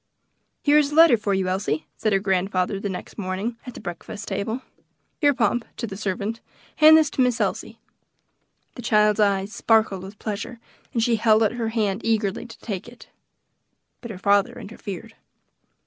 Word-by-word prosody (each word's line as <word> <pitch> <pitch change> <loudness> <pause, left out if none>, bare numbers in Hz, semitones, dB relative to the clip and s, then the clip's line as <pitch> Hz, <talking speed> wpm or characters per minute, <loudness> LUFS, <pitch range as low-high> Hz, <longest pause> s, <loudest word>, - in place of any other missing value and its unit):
"Here 295 +1 +5
is 290 -1 +1
a - - -4
letter 325 -5 +8
for 205 -3 -1
you, 190 -1 0
Elsie," 185 -5 -1
said 215 - -1
her 195 - +4
grandfather, 190 0 0
the 200 - -3
next 190 +3 -7
morning, 195 +5 -3
at 250 - -8
the - - -8
breakfast 180 +3 -7
table. 210 +6 -3 0.6
"Here, 290 -2 +4
Pomp" 240 -2 +1
to 235 - -3
the 200 -4 -7
servant 205 +2 -3 0.4
"hand 310 0 +8
this 310 -2 +2
to - - 0
Miss 250 -2 +2
Elsie." 215 +2 -2 1.0
The - - -9
child's 210 -2 +3
eyes 200 0 +1
sparkled 220 -5 +2
with 195 +2 -10
pleasure, 225 +3 -5 0.3
and 230 -4 0
she 230 -1 +2
held 220 0 +4
out 215 - +2
her 235 -2 -2
hand 215 -2 -1
eagerly 220 0 0
to 230 - -12
take 200 -3 -5
it. 240 0 -14 0.9
But 235 - -8
her 210 - -6
father 200 +1 +2
interfered. 210 0 -8
215 Hz, 180 wpm, -23 LUFS, 195-235 Hz, 1.0 s, letter